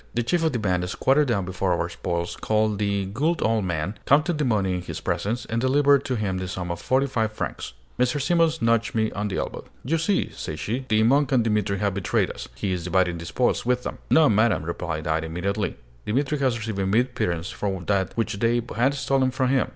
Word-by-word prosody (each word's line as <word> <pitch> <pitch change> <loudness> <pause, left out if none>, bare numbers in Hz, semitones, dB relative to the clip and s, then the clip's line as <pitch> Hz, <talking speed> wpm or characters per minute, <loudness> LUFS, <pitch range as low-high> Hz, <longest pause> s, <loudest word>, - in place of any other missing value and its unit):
The 120 - +1
chief 165 +8 +1
of 160 - +2
the 125 - -1
band 90 -4 0
squatted 140 +8 +2
down 100 -6 0
before 90 0 -1
our 85 - 0
spoils, 85 -1 -3
called 110 -1 0
"the 100 -1 0
good 150 - 0
old 110 -2 +1
man," 90 +4 -3
counted 150 +3 +3
the 150 - +1
money 100 -6 +1
in 90 - -2
his 90 - -6
presence, 120 +4 -2
and 115 +1 -2
delivered 140 +1 +4
to 130 - -1
him 100 -4 -1
the 95 - -4
sum 90 -1 -4
of 85 - -5
forty 130 +1 +2
five 115 -5 -1
francs. 85 - -5 0.3
Mrs. 125 +3 +1
Simons 165 -2 +2
nudged 115 -2 +2
me 110 -1 +1
on 105 +1 -2
the 95 - -3
elbow. - - -4 0.2
"You 160 +5 +1
see," 190 +5 0
said 75 - -5
she, 120 - -3
"the 110 0 +3
monk 140 +5 +3
and 125 -3 +4
Dimitri 105 -3 0
have 100 0 0
betrayed 100 -1 0
us: - - -8
he 100 - -2
is 90 -2 -3
dividing 90 -1 +1
the 85 - -7
spoils 125 +6 +1
with 125 0 0
them." - - -5
"No, 160 -1 +6
madam," 110 - +3
replied 80 -1 -4
I, 80 0 +1
immediately. 90 +5 -2 0.3
"Dimitri 140 +6 0
has 130 -4 +1
received 110 -3 -4
a 95 - 0
mere 110 +5 +4
pittance 90 -8 -3
from 95 -3 -3
that 100 0 0
which 110 -3 -1
they 120 +2 +2 0.2
had 135 +5 +2
stolen 135 0 +1
from 130 0 0
him. 130 -1 +2
110 Hz, 230 wpm, -24 LUFS, 95-130 Hz, 0.3 s, No